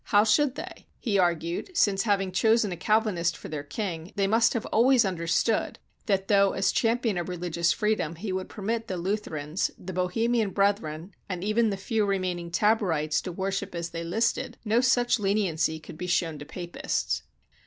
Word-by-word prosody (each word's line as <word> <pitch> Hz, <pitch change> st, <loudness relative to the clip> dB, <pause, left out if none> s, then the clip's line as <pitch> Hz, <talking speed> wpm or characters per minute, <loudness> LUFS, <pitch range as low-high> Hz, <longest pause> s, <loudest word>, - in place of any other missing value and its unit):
How 205 Hz, 0 st, +4 dB
should 265 Hz, +5 st, +3 dB
they? -, -, -8 dB
he 205 Hz, -6 st, 0 dB
argued, 175 Hz, -, -1 dB
since, 195 Hz, -2 st, +3 dB
having 195 Hz, -3 st, +1 dB
chosen 220 Hz, +2 st, +3 dB
a -, -, -2 dB
Calvinist 190 Hz, -3 st, +1 dB
for -, -, -9 dB
their 150 Hz, -2 st, -4 dB
king, 165 Hz, +3 st, -5 dB
they 200 Hz, -2 st, +2 dB
must 225 Hz, +4 st, +3 dB
have 230 Hz, -, -2 dB
always 240 Hz, +1 st, +5 dB
under 170 Hz, -3 st, -3 dB
stood 215 Hz, +7 st, +1 dB, 0.3 s
that, 195 Hz, -2 st, +1 dB
though 200 Hz, -1 st, +4 dB
as 195 Hz, -, +1 dB
champion 225 Hz, -4 st, +1 dB
of 175 Hz, -, -4 dB
religious 170 Hz, -1 st, 0 dB
freedom 210 Hz, -7 st, 0 dB
he 190 Hz, +4 st, -5 dB
would 185 Hz, 0 st, -3 dB
permit 225 Hz, +2 st, -3 dB
the 185 Hz, -, -3 dB
Lutherans, 175 Hz, -4 st, -2 dB
the 185 Hz, +1 st, -7 dB
Bohemian 220 Hz, +5 st, +1 dB
Brethren, 195 Hz, -4 st, 0 dB, 0.2 s
and 180 Hz, -1 st, -4 dB
even 215 Hz, +2 st, +2 dB
the 200 Hz, -, -2 dB
few 220 Hz, +2 st, 0 dB
remaining 185 Hz, -3 st, -1 dB
Taborites 170 Hz, -6 st, +1 dB
to 185 Hz, -, -5 dB
worship 195 Hz, +1 st, -3 dB
as 170 Hz, 0 st, -4 dB
they 170 Hz, 0 st, -4 dB
listed, 230 Hz, +7 st, -1 dB
no 225 Hz, +3 st, +3 dB
such 245 Hz, -2 st, +3 dB
leniency 185 Hz, -6 st, 0 dB
could 155 Hz, +1 st, -12 dB
be 180 Hz, -, -4 dB
shown 165 Hz, -4 st, 0 dB
to 145 Hz, -, -8 dB
Papists. 175 Hz, +3 st, -3 dB
195 Hz, 180 wpm, -27 LUFS, 170-220 Hz, 0.3 s, always